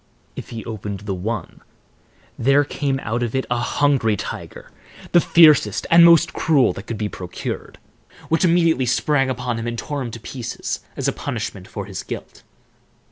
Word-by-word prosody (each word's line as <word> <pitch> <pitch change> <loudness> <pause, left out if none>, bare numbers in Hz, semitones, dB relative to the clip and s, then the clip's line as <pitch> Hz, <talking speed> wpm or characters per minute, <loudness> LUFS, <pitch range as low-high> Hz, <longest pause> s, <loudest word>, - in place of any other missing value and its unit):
If - - -8
he 115 -2 -7
opened 105 -3 -5
the 100 -1 -3
one, 95 +1 -5 0.7
there 140 +4 +3
came 140 -1 -2
out 115 +3 -2
of 120 0 -2
it 130 - 0
a 120 - +1
hungry 120 -4 +1
tiger, - - -7 0.4
the 175 - +6
fiercest 155 - +5
and 170 0 +8
most 170 +1 +6
cruel 140 - +3
that 100 - -9
could 115 - -4
be 105 - -2
procured, 90 -3 -6 0.5
which 165 +2 +1
immediately 165 -6 +3
sprang 135 +2 +2
upon 125 -2 -2
him 115 - -4
and 120 0 -3
tore 145 +3 -4
him 125 - -4
to 115 - -8
pieces 120 +1 -5 0.2
as - - -1
a - - +1
punishment - - -5
for - - -6
his - - -6
guilt. - - -8
125 Hz, 175 wpm, -21 LUFS, 110-145 Hz, 0.7 s, and